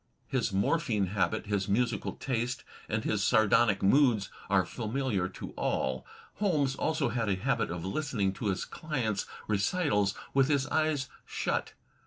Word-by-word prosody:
His -, -, -1 dB
morphine 105 Hz, +1 st, +1 dB
habit, 110 Hz, +1 st, 0 dB
his 100 Hz, -2 st, -1 dB
musical 120 Hz, +3 st, 0 dB
taste 125 Hz, -1 st, -2 dB, 0.3 s
and 110 Hz, 0 st, -1 dB
his 105 Hz, -2 st, 0 dB
sardonic 110 Hz, -2 st, +4 dB
moods 115 Hz, -2 st, +4 dB, 0.2 s
are 95 Hz, -2 st, +4 dB
familiar 110 Hz, -4 st, -1 dB
to -, -, -8 dB
all. 65 Hz, 0 st, -1 dB, 0.3 s
Holmes 155 Hz, -10 st, +2 dB
also 155 Hz, -4 st, 0 dB
had 115 Hz, -2 st, -1 dB
a 95 Hz, -, +2 dB
habit 115 Hz, +1 st, 0 dB
of 85 Hz, 0 st, -4 dB
listening 105 Hz, -4 st, -1 dB
to 105 Hz, -, -4 dB
his 95 Hz, -2 st, -1 dB
clients' 125 Hz, -, -2 dB, 0.2 s
recitals 105 Hz, -, +1 dB, 0.2 s
with 135 Hz, -1 st, +4 dB
his 140 Hz, -2 st, +2 dB
eyes 155 Hz, -4 st, +1 dB, 0.2 s
shut. -, -, -2 dB
110 Hz, 145 wpm, -30 LUFS, 100-135 Hz, 0.3 s, sardonic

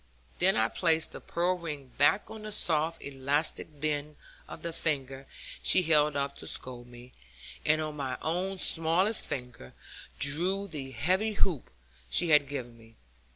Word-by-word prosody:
Then 190 Hz, +2 st, +3 dB
I 110 Hz, -, +3 dB
placed 160 Hz, +4 st, +1 dB
the -, -, -9 dB
pearl 175 Hz, +2 st, 0 dB
ring 145 Hz, -6 st, -6 dB
back 145 Hz, +8 st, +5 dB
on 220 Hz, -, -9 dB
the 215 Hz, 0 st, -6 dB
soft 165 Hz, -4 st, +1 dB
elastic 140 Hz, +2 st, -1 dB
bend 150 Hz, 0 st, -2 dB, 0.3 s
of -, -, -9 dB
the 170 Hz, -1 st, -1 dB
finger 135 Hz, -4 st, -1 dB, 0.3 s
she 185 Hz, -, +5 dB
held 150 Hz, -2 st, +4 dB
up 140 Hz, 0 st, -2 dB
to -, -, -9 dB
scold 125 Hz, -1 st, -7 dB
me; 120 Hz, +1 st, -14 dB, 0.6 s
and 155 Hz, 0 st, +4 dB
on 155 Hz, -1 st, -5 dB
my 135 Hz, -3 st, -3 dB
own 185 Hz, +4 st, -2 dB
smallest 175 Hz, +6 st, +2 dB
finger 125 Hz, -, -7 dB, 0.4 s
drew 180 Hz, +8 st, +1 dB
the 145 Hz, -7 st, -6 dB
heavy 190 Hz, +10 st, 0 dB
hoop 180 Hz, -, 0 dB, 0.4 s
she 175 Hz, -, +3 dB
had 150 Hz, -3 st, +5 dB
given 125 Hz, -4 st, -6 dB
me. 115 Hz, 0 st, -19 dB
150 Hz, 155 wpm, -29 LUFS, 135-175 Hz, 0.6 s, back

